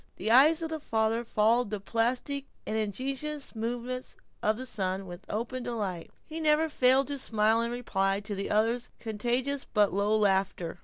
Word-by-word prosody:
The 220 Hz, -, -2 dB
eyes 305 Hz, +7 st, +6 dB
of 325 Hz, -, -2 dB
the 320 Hz, 0 st, -3 dB
father 225 Hz, -3 st, 0 dB
followed 230 Hz, +1 st, +2 dB
the 210 Hz, -1 st, -3 dB
plastic 245 Hz, +7 st, -1 dB, 0.2 s
and 215 Hz, -, -2 dB
ingenious 270 Hz, +7 st, -3 dB
movements 245 Hz, +3 st, -4 dB, 0.2 s
of 215 Hz, 0 st, +1 dB
the 255 Hz, -, -6 dB
son 195 Hz, -5 st, -2 dB
with 180 Hz, +1 st, -10 dB
open 235 Hz, +4 st, -3 dB
delight, 205 Hz, -8 st, -3 dB
and -, -, -29 dB
he 320 Hz, +1 st, -6 dB
never 310 Hz, 0 st, +3 dB
failed 265 Hz, -1 st, +4 dB
to 285 Hz, -1 st, -2 dB
smile 220 Hz, -1 st, +2 dB
in 235 Hz, -, 0 dB
reply 195 Hz, -5 st, 0 dB
to 205 Hz, 0 st, -5 dB
the 195 Hz, 0 st, -3 dB
other's 230 Hz, +3 st, +1 dB
contagious 245 Hz, +5 st, -1 dB
but 205 Hz, -4 st, +2 dB
low 205 Hz, +2 st, +2 dB
laughter. 190 Hz, -4 st, 0 dB
230 Hz, 175 wpm, -29 LUFS, 210-255 Hz, 0.2 s, eyes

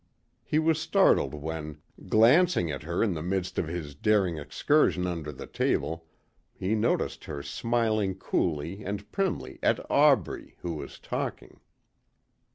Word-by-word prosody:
He 150 Hz, -, 0 dB
was 160 Hz, 0 st, +2 dB
startled -, -, +3 dB
when, 75 Hz, 0 st, -5 dB, 0.3 s
glancing 120 Hz, -, +5 dB
at 70 Hz, -, -5 dB
her 85 Hz, +6 st, -1 dB
in 105 Hz, -5 st, +1 dB
the 80 Hz, -, -4 dB
midst 95 Hz, +2 st, -2 dB
of 80 Hz, -, -1 dB
his 80 Hz, -3 st, -5 dB
daring 95 Hz, 0 st, +1 dB
excursion 90 Hz, -, +2 dB
under 85 Hz, -4 st, -3 dB
the 70 Hz, -, -9 dB
table, 80 Hz, 0 st, -1 dB, 0.5 s
he 95 Hz, +4 st, -1 dB
noticed 110 Hz, +2 st, 0 dB
her 70 Hz, -1 st, -6 dB
smiling 110 Hz, +2 st, 0 dB
coolly 85 Hz, +1 st, -2 dB
and 100 Hz, +1 st, -5 dB
primly 190 Hz, -, -2 dB
at -, -, +2 dB
Aubrey 140 Hz, -, +3 dB
who 85 Hz, -, -3 dB
was 75 Hz, -, -7 dB
talking. -, -, -5 dB
90 Hz, 140 wpm, -28 LUFS, 80-115 Hz, 0.5 s, glancing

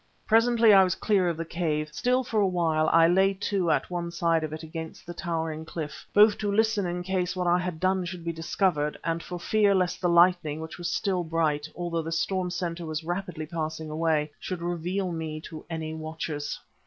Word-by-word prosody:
Presently 230 Hz, -1 st, +5 dB
I 195 Hz, -1 st, +8 dB
was 185 Hz, -1 st, +1 dB
clear 195 Hz, -5 st, +2 dB
of 165 Hz, -, -3 dB
the 165 Hz, -, -3 dB
cave. 155 Hz, -3 st, -2 dB
Still 250 Hz, +9 st, +1 dB
for 225 Hz, -3 st, -1 dB
a 200 Hz, -, +3 dB
while 160 Hz, -4 st, +1 dB
I 165 Hz, 0 st, +6 dB
lay 190 Hz, +3 st, +3 dB
to 190 Hz, -2 st, -1 dB
at -, -, +1 dB
one 175 Hz, -1 st, -2 dB
side 170 Hz, -1 st, +1 dB
of 155 Hz, -, -3 dB
it 155 Hz, +1 st, -6 dB
against 160 Hz, 0 st, -7 dB
the 175 Hz, -, -7 dB
towering 160 Hz, -2 st, -3 dB
cliff, 160 Hz, -2 st, -7 dB
both 210 Hz, 0 st, +6 dB
to 205 Hz, -1 st, -1 dB
listen 215 Hz, -2 st, +2 dB
in 175 Hz, 0 st, -3 dB
case 185 Hz, 0 st, -1 dB
what 180 Hz, -1 st, -1 dB
I 175 Hz, +1 st, +3 dB
had 180 Hz, -3 st, -4 dB
done 185 Hz, +1 st, +1 dB
should 175 Hz, -1 st, -7 dB
be 170 Hz, -, -1 dB
discovered, 165 Hz, -2 st, 0 dB
and 165 Hz, 0 st, -1 dB
for 180 Hz, +1 st, -6 dB
fear 205 Hz, +2 st, +3 dB
lest 180 Hz, -2 st, 0 dB
the 175 Hz, -, +2 dB
lightning 170 Hz, -3 st, +4 dB
which 160 Hz, +2 st, -8 dB
was 175 Hz, -, -2 dB
still 185 Hz, -3 st, 0 dB
bright, 155 Hz, -2 st, 0 dB
although 170 Hz, -1 st, -2 dB
the 165 Hz, +1 st, -5 dB
storm 180 Hz, +2 st, 0 dB
centre 175 Hz, -2 st, -4 dB
was 155 Hz, +1 st, -3 dB
rapidly 175 Hz, -2 st, -4 dB
passing 160 Hz, -1 st, -4 dB
away, 155 Hz, -1 st, 0 dB
should 180 Hz, -3 st, -5 dB
reveal 175 Hz, +2 st, -2 dB
me 160 Hz, -2 st, -4 dB
to 160 Hz, -1 st, -9 dB
any 160 Hz, -1 st, -4 dB
watchers. 155 Hz, -2 st, -4 dB
170 Hz, 210 wpm, -27 LUFS, 160-185 Hz, -, I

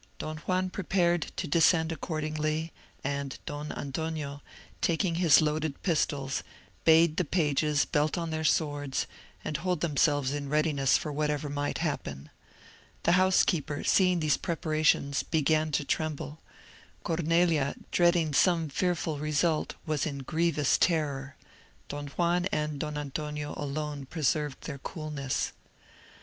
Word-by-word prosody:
Don 155 Hz, 0 st, -5 dB
Juan 185 Hz, +3 st, -1 dB
prepared 175 Hz, -3 st, +1 dB
to 180 Hz, -, -3 dB
descend 160 Hz, +1 st, +4 dB
accordingly, 155 Hz, 0 st, -2 dB, 0.3 s
and 140 Hz, -1 st, -3 dB
Don 145 Hz, +1 st, -5 dB
Antonio, 145 Hz, 0 st, -4 dB, 0.4 s
taking 170 Hz, +1 st, +1 dB
his 165 Hz, -4 st, +7 dB
loaded 155 Hz, -1 st, -1 dB
pistols, 145 Hz, -6 st, 0 dB, 0.4 s
bade 160 Hz, 0 st, +5 dB
the -, -, +3 dB
pages 150 Hz, -2 st, +1 dB
belt 150 Hz, +3 st, +1 dB
on 165 Hz, -1 st, -2 dB
their 160 Hz, 0 st, -2 dB
swords, 145 Hz, -3 st, 0 dB, 0.4 s
and 150 Hz, -, -1 dB
hold 180 Hz, 0 st, -1 dB
themselves 145 Hz, -3 st, +2 dB
in 145 Hz, -1 st, -4 dB
readiness 150 Hz, -3 st, +3 dB
for 150 Hz, -, -4 dB
whatever 150 Hz, 0 st, -1 dB
might 145 Hz, 0 st, -2 dB
happen. 70 Hz, -, -4 dB, 0.7 s
The -, -, +3 dB
housekeeper, 175 Hz, -5 st, +2 dB
seeing 180 Hz, -3 st, +3 dB
these 150 Hz, -2 st, +2 dB
preparations 155 Hz, -3 st, +1 dB
began 155 Hz, 0 st, +1 dB
to 145 Hz, -, +1 dB
tremble,—Cornelia, 160 Hz, +1 st, -1 dB, 0.2 s
dreading 170 Hz, -3 st, +3 dB
some 165 Hz, 0 st, +3 dB
fearful 165 Hz, -1 st, -1 dB
result 155 Hz, +1 st, 0 dB
was 155 Hz, -2 st, 0 dB
in 140 Hz, -2 st, -5 dB
grievous 155 Hz, -1 st, +1 dB
terror,—Don 145 Hz, -2 st, -3 dB
Juan 175 Hz, +4 st, +1 dB
and 150 Hz, -1 st, -1 dB
Don 150 Hz, 0 st, -3 dB
Antonio 150 Hz, +1 st, -4 dB
alone 145 Hz, -1 st, -4 dB
preserved 150 Hz, -2 st, -1 dB
their 140 Hz, -3 st, -6 dB
coolness. 150 Hz, -3 st, -3 dB
155 Hz, 120 wpm, -29 LUFS, 145-165 Hz, 0.7 s, his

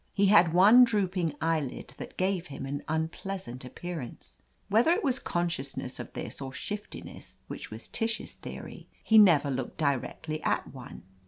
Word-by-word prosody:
He 200 Hz, -, +4 dB
had 185 Hz, -4 st, +6 dB
one 205 Hz, +8 st, +8 dB
drooping 190 Hz, -8 st, 0 dB
eyelid, 155 Hz, -6 st, -2 dB
that -, -, -8 dB
gave 185 Hz, -2 st, 0 dB
him 135 Hz, -1 st, -7 dB
an 140 Hz, +1 st, -4 dB
unpleasant 160 Hz, -4 st, -4 dB
appearance. 155 Hz, 0 st, -8 dB, 0.3 s
Whether 225 Hz, -, +4 dB
it 400 Hz, +4 st, -1 dB
was 265 Hz, -2 st, +2 dB
consciousness 150 Hz, -7 st, -3 dB
of -, -, -7 dB
this, -, -, -5 dB
or 135 Hz, -1 st, -6 dB
shiftiness, 210 Hz, +9 st, -7 dB
which -, -, -7 dB
was -, -, -8 dB
Tish's 225 Hz, -1 st, -1 dB
theory, -, -, -9 dB, 0.2 s
he 220 Hz, -1 st, +6 dB
never 155 Hz, -9 st, +6 dB
looked 130 Hz, -1 st, -4 dB
directly 155 Hz, +2 st, -2 dB
at -, -, -1 dB
one. 130 Hz, -8 st, -10 dB
170 Hz, 155 wpm, -29 LUFS, 140-200 Hz, 0.3 s, one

